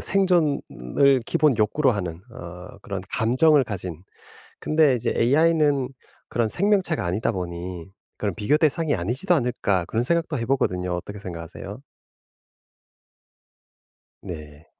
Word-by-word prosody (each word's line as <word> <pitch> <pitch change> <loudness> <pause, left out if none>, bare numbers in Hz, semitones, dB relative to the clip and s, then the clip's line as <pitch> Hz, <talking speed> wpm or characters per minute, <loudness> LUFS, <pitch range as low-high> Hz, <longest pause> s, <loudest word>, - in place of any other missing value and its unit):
생존을 140 - +2
기본 150 -6 +3
욕구로 130 +6 +3
하는 90 -6 -3
어 90 -5 -10
그런 100 -2 -4
감정을 130 +5 +4
가진 90 -5 -6 0.6
근데 155 -4 +3
이제 120 0 -1
ai는 145 +1 +3 0.4
그런 115 -2 0
생명체가 190 - +1
아니다 90 +5 0
보니 90 -2 -5 0.3
그런 100 -4 -2
비교 110 +8 +2
대상이 155 0 +1
아니지도 125 - 0
않을까 120 - 0
그런 115 +7 -1
생각도 165 +1 0
해 115 - -2
보거든요. 90 -9 0
어떻게 100 +4 -6
생각하세요? 85 -4 -8 2.4
네. 75 -4 -9
115 Hz, 280 characters per minute, -24 LUFS, 90-150 Hz, 2.4 s, 감정을